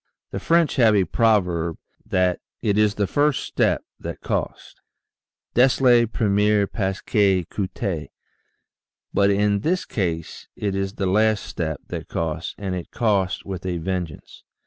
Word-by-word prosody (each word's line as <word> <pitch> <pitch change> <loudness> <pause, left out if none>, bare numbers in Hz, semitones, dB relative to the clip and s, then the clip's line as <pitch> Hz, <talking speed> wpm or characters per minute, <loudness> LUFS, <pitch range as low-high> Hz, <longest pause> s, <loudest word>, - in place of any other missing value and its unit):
The - - -3
French 170 -2 +2
have 115 -4 +5
a 95 -2 +3
proverb 90 -8 +1 0.3
that 90 -1 +1
" - - -57
it 105 -2 +2
is 105 -1 +3
the 105 - +1
first 145 +5 +1
step - - +1 0.2
that - - -6
costs" - - -3 0.8
(dest 125 +2 +4
le 120 -3 +5
premier 105 -1 +2
pas 95 -2 -2
qui 95 -4 +2
coute] 95 - -3 1.0
but 100 0 +4
in 100 0 +2
this 175 - 0
case 85 -6 -3
it 100 -2 -2
is 95 0 -2
the 100 - -2
last 110 +3 +2
step 80 -3 -4
that - - -5
costs 80 0 -3
and 95 -2 -3
it 90 -2 -5
costs 100 -5 0
with 95 -3 -5
a 90 -2 -2
vengeance. 85 -2 -5
100 Hz, 150 wpm, -23 LUFS, 90-110 Hz, 1.0 s, have